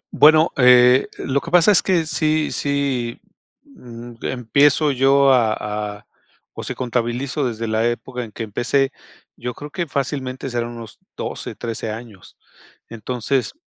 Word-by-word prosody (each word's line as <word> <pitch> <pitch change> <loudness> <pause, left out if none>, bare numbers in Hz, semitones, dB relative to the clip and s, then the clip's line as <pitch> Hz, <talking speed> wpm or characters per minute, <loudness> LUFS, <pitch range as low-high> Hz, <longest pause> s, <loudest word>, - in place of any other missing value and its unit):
Bueno, 155 +2 +6
eh, 125 0 +6
lo 140 +1 -1
que 165 - -8
pasa 180 +3 +5
es 195 - +4
que 175 -4 +1
sí 155 0 0
sí, 140 -5 -2 0.4
mm, 120 - -12
empiezo 140 +4 +2
yo 135 +1 +4
a 115 -4 +3 0.4
a, 105 - -22 0.5
o - - -7
sea - - -5
contabilizo 125 +3 -2
desde 115 -1 -4
la 110 +1 +1
época 125 +1 -5
en 110 - -10
que 115 - -6
empecé, 135 +6 0 0.4
yo 125 0 -6
creo 145 0 -9
que 170 -3 -3
fácilmente 135 -1 -3
serán 120 -1 -2
unos 115 -3 -11 0.2
12, - - -5
13 115 -1 -5
años. 110 -4 -10 0.5
Entonces, 125 +3 -2
130 Hz, 145 wpm, -20 LUFS, 120-140 Hz, 0.5 s, Bueno